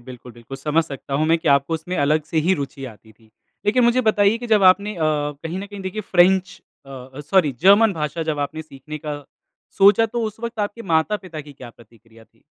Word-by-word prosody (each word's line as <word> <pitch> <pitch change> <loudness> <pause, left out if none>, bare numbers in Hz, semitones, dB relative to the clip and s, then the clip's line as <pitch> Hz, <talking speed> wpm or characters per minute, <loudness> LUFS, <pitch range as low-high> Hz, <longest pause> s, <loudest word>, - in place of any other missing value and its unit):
बिल्कुल, 125 -1 -11
बिल्कुल, 120 +3 -10
समझ 155 +3 0
सकता 140 0 -7
हूँ 155 +2 +1
मैं 165 +1 +3
कि 160 - -2
आपको 140 +3 +2
उसमें 170 +3 -5
अलग 150 +2 +1
से - - -4
ही 190 - +4
रुचि 135 0 -8
आती 110 +1 -21
थी। 110 0 -27 0.4
लेकिन 240 +4 +3
मुझे 240 +2 +3
बताइए 205 +1 +2
कि 240 - -7
जब 215 -3 +3
आपने 200 +3 +4
अ, - - -9
कहीं 150 +2 -2
न 200 - -6
कहीं 205 0 -10
देखिए 190 +3 -4
फ्रेंच 185 +2 +3 0.3
अ - - -13
अ, 130 +1 -10
सॉरी 150 0 +2
जर्मन 200 +3 +6
भाषा 155 0 -3
जब 150 - -3
आपने 155 +2 -4
सीखने 155 0 -10
का, 145 -1 -6 0.5
सोचा 205 +3 +6
तो 235 +1 -4
उस 220 0 -6
वक़्त 235 0 -6
आपके 205 +3 -4
माता-पिता 165 0 -1
की 145 - -11
क्या 130 -3 -12
प्रतिक्रिया 115 -1 -20
थी? - - -35
160 Hz, 220 wpm, -21 LUFS, 140-200 Hz, 0.5 s, जर्मन